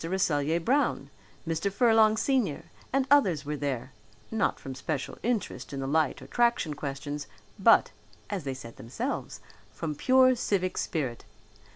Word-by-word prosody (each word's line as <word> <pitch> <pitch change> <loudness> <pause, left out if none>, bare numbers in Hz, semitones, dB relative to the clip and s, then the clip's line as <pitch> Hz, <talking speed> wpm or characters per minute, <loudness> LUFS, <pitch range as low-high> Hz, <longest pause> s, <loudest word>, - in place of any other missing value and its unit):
Rasselyer 165 -3 +1
Brown, 240 - 0 0.4
Mr. 165 +5 -1
Furlong 220 0 +4
senior 230 - 0 0.3
and 270 0 +2
others 185 - +4
were 150 +1 -2
there, 135 -3 -3 0.4
not 220 -1 0
from 135 - -7
special 135 +2 -4
interest 230 -10 -2
in 135 - -4
the 135 - -3
light 150 +1 +1
or - - -10
traction 235 -10 +1
questions, 145 0 -5 0.3
but, - - +5 0.4
as 200 -5 -4
they 135 -1 -3
said 115 -3 -10
themselves, 115 +3 -4 0.3
from 150 +8 -4
pure 255 - +5
civic 195 -6 -1
spirit. 130 -8 -2
160 Hz, 145 wpm, -28 LUFS, 140-225 Hz, 0.4 s, but